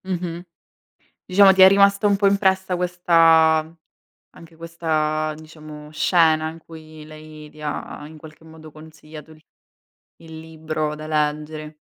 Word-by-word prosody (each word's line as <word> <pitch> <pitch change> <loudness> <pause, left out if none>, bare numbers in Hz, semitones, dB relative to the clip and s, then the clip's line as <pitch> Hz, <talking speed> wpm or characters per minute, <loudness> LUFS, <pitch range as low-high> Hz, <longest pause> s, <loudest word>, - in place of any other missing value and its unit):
Mh-mh. 175 -2 -5 0.8
Diciamo 195 +1 +5
ti 190 0 +3
è 190 - +10
rimasta 200 +1 +3
un 200 - +1
po' 200 0 0
impressa 190 -2 0
questa 165 -2 +2 0.6
anche 165 0 -16
questa 155 -2 -3
diciamo, 155 -1 -13
scena 160 -1 +1
in 160 - -11
cui 155 -1 -14
lei 155 0 -13
ti 155 - -17
ha, 150 0 -7
in 155 0 -14
qualche 155 +1 -16
modo, 160 -1 -15
consigliato 155 0 -14 0.7
il 160 -1 -15
libro 155 -1 -5
da 155 0 -10
leggere. 150 0 -4
160 Hz, 130 wpm, -20 LUFS, 155-170 Hz, 0.8 s, è